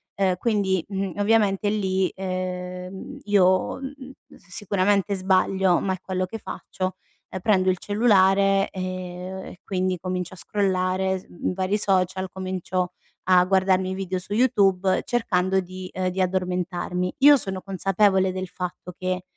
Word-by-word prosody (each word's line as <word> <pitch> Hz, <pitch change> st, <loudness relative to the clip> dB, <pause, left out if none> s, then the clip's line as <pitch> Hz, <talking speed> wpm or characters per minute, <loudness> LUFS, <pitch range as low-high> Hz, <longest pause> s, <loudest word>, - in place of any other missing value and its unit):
Ehm, 190 Hz, -2 st, +2 dB
quindi, 195 Hz, -5 st, +1 dB
mhmm, 195 Hz, -2 st, -2 dB
ovviamente 205 Hz, -1 st, +2 dB
lì, 190 Hz, -3 st, +1 dB
ehm 185 Hz, +4 st, -5 dB
io, 185 Hz, -1 st, +3 dB
mhmm, 270 Hz, -1 st, -8 dB, 0.3 s
s -, -, -24 dB
sicuramente 200 Hz, +1 st, +1 dB
sbaglio, 190 Hz, -1 st, +2 dB
ma 190 Hz, -1 st, -1 dB
è 185 Hz, -, -6 dB
quello 185 Hz, -1 st, -2 dB
che 225 Hz, -, -6 dB
faccio, 185 Hz, -3 st, -5 dB, 0.3 s
ehm, 185 Hz, -, -5 dB
prendo 190 Hz, -2 st, +3 dB
il 185 Hz, -, -2 dB
cellulare 195 Hz, -2 st, +3 dB
e 185 Hz, -1 st, -5 dB, 0.3 s
e 180 Hz, -, -18 dB
quindi 185 Hz, -1 st, -1 dB
comincio 185 Hz, +1 st, -4 dB
a -, -, -17 dB
scrollare 190 Hz, -1 st, 0 dB
s -, -, -18 dB
mhmm, 180 Hz, -, -3 dB
vari 190 Hz, +2 st, 0 dB
social, 190 Hz, -1 st, +1 dB
comincio 185 Hz, -1 st, -3 dB, 0.3 s
a 180 Hz, -1 st, +6 dB
guardarmi 190 Hz, 0 st, +2 dB
video 190 Hz, -1 st, -3 dB
su 195 Hz, +3 st, -7 dB
YouTube 195 Hz, -6 st, +3 dB
cercando 190 Hz, -5 st, +1 dB
di 185 Hz, 0 st, -8 dB
ehm, 185 Hz, 0 st, -1 dB
di 190 Hz, +1 st, -2 dB
addormentarmi. 180 Hz, 0 st, -1 dB
Io 290 Hz, 0 st, +10 dB
sono 190 Hz, -5 st, -3 dB
consapevole 190 Hz, 0 st, +2 dB
del 185 Hz, 0 st, -4 dB
fatto 180 Hz, 0 st, -6 dB
che, 185 Hz, 0 st, -2 dB
190 Hz, 145 wpm, -24 LUFS, 185-195 Hz, 0.3 s, Io